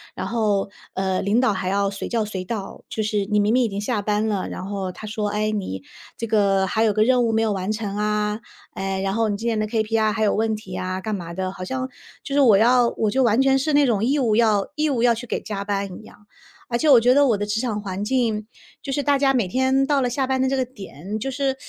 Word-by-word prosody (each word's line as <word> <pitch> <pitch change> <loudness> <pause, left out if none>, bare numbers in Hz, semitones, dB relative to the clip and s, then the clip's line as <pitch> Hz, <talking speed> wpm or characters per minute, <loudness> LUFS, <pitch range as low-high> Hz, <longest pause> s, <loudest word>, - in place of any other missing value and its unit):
然 - - -4
后， 210 -4 0 0.2
呃， 190 -1 -1
领 210 +5 +2
导 255 -4 +3
还 190 -1 -3
要 200 +1 +1
随 195 - -5
叫 230 -2 0
随 190 -3 -5
到， 205 -1 -6
就 220 - -2
是 210 -1 0
你 210 +1 0
明 205 +1 +2
明 255 - +4
已 235 - +1
经 200 0 -4
下 210 -1 -1
班 210 +1 0
了， 200 -3 -1
然 185 - -6
后 195 -2 -3
他 215 - -10
说， 210 0 -2
“哎， 215 +1 -1
你 185 - -4 0.3
这 230 - -3
个， 200 -3 +2
还 220 - +1
有 215 - +2
个 215 +1 +3
任 250 0 +3
务 225 - 0
没 220 - +2
有 220 -2 +1
完 190 0 -3
成 210 -2 -3
啊， 210 0 0 0.3
哎， 195 0 -3
然 195 0 -1
后 225 +1 +1
你 205 - -1
今 225 - -7
年 220 -2 0
的 215 - -1
KPI 220 -1 +1
还 220 0 -1
有 205 - +3
问 220 0 0
题 200 -3 -9
啊” 185 +1 -3
干 215 - -2
嘛 170 -2 -7
的， 185 +1 -3
好 185 -1 -7
像， 260 +3 -3 0.3
就 275 - -6
是 285 - +3
我 235 -7 +6
要 240 +2 +4
我 215 -2 +1
就 265 +2 +2
完 230 +2 +3
全 270 0 +3
是 305 +2 0
那 290 0 +5
种 220 -5 +1
义 280 +4 +2
务 230 -6 +2
要 215 -4 +2
义 305 0 +1
务 245 -5 0
要 240 -1 +5
去 235 +2 -7
给 - - -2
加 200 -1 -5
班 200 -2 -3
一 - - -14
样。 210 - -17 0.4
而 235 0 -1
且 315 - +2
我 260 -4 +8
觉 245 +2 +4
得 285 +1 +5
我 225 -5 +2
的 205 - -2
职 210 +2 -1
场 220 -5 -2
环 195 -1 -4
境， 220 -3 0 0.3
就 275 - -5
是 285 +1 -1
大 285 0 +2
家 270 -1 +3
每 235 -7 +1
天 260 +6 +2
到 280 -1 +2
了 250 - +1
下 265 +2 -1
班 260 0 0
的 260 - +2
这 270 - 0
个 260 - +1
点， 200 - -8
就 270 +5 -3
是 270 0 -1
215 Hz, 300 characters per minute, -22 LUFS, 200-250 Hz, 0.4 s, 我